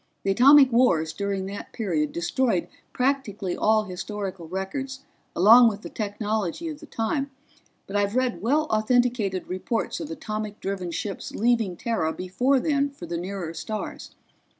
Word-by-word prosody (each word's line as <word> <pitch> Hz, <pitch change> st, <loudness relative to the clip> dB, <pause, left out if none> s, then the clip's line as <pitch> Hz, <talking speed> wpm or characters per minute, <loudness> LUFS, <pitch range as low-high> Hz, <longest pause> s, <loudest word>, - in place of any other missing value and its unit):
"The 195 Hz, -, +1 dB
atomic 270 Hz, +5 st, +7 dB
wars 165 Hz, -10 st, +3 dB
during 200 Hz, +1 st, -2 dB
that 200 Hz, +1 st, -7 dB
period 160 Hz, -9 st, -1 dB
destroyed 180 Hz, +3 st, 0 dB, 0.2 s
practically 250 Hz, -8 st, -1 dB
all 215 Hz, 0 st, +3 dB
historical 190 Hz, -2 st, -5 dB
records 260 Hz, -, -4 dB, 0.3 s
along 230 Hz, +6 st, +8 dB
with 210 Hz, 0 st, -7 dB
the -, -, -8 dB
technology 210 Hz, -, -2 dB
of 300 Hz, -2 st, -7 dB
the -, -, -12 dB
time, 275 Hz, +5 st, -2 dB, 0.6 s
but 195 Hz, -, -7 dB
I've 205 Hz, +1 st, +1 dB
read 250 Hz, -8 st, 0 dB
well 285 Hz, +8 st, +2 dB
authenticated 220 Hz, -3 st, +1 dB
reports 185 Hz, +5 st, -2 dB
of 305 Hz, -, -6 dB
atomic 215 Hz, -8 st, -5 dB
driven 190 Hz, -2 st, -3 dB
ships 180 Hz, +4 st, -5 dB
leaving 225 Hz, -5 st, +1 dB
Terra 190 Hz, -9 st, -1 dB
before 250 Hz, +9 st, +1 dB
then 285 Hz, 0 st, +1 dB
for 275 Hz, -11 st, -10 dB
the 170 Hz, 0 st, -4 dB
nearer 180 Hz, -2 st, -5 dB
stars. 215 Hz, +5 st, -6 dB
210 Hz, 150 wpm, -25 LUFS, 190-250 Hz, 0.6 s, along